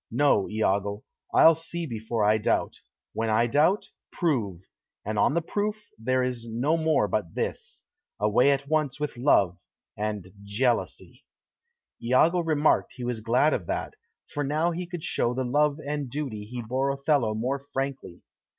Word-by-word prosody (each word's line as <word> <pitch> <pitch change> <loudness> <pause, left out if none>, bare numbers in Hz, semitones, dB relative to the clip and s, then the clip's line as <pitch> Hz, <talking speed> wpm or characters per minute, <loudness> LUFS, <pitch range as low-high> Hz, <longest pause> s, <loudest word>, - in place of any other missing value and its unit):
No, 125 -5 +2
Iago; 100 -1 0 0.3
I'll 165 - +7
see 165 +1 -4
before 110 -4 -2
I 105 +1 +4
doubt; - - 0 0.4
when 115 0 -1
I 110 +2 +3
doubt, 150 - +2 0.2
prove; 105 - -1 0.4
and 105 0 -2
on 140 - +3
the 170 - +1
proof 210 +4 -3
there 130 +3 +1
is 125 -2 -3
no 130 +8 +1
more 160 -1 +2
but - - -2
this 475 0 -4 0.3
away 105 +6 +4
at 140 0 +1
once 150 -3 0
with 150 -3 -3
love, 100 -9 +3 0.4
and 105 -3 -4
jealousy." 115 +4 -2 0.8
Iago 130 +9 +3
remarked 155 -3 +2
he 125 - -8
was 120 -2 -2
glad 125 +7 +2
of 85 - -3
that, - - -3 0.3
for 145 - -3
now 155 +5 +1
he 175 +1 -4
could 175 -3 -7
show 120 +1 0
the 130 - -1
love 145 +3 +2
and 145 -2 -3
duty 120 -7 -4
he 120 +2 -6
bore 130 +4 -1
Othello 140 -5 +1
more 130 +5 -1
frankly. 135 -9 -5
130 Hz, 160 wpm, -26 LUFS, 110-150 Hz, 0.8 s, I'll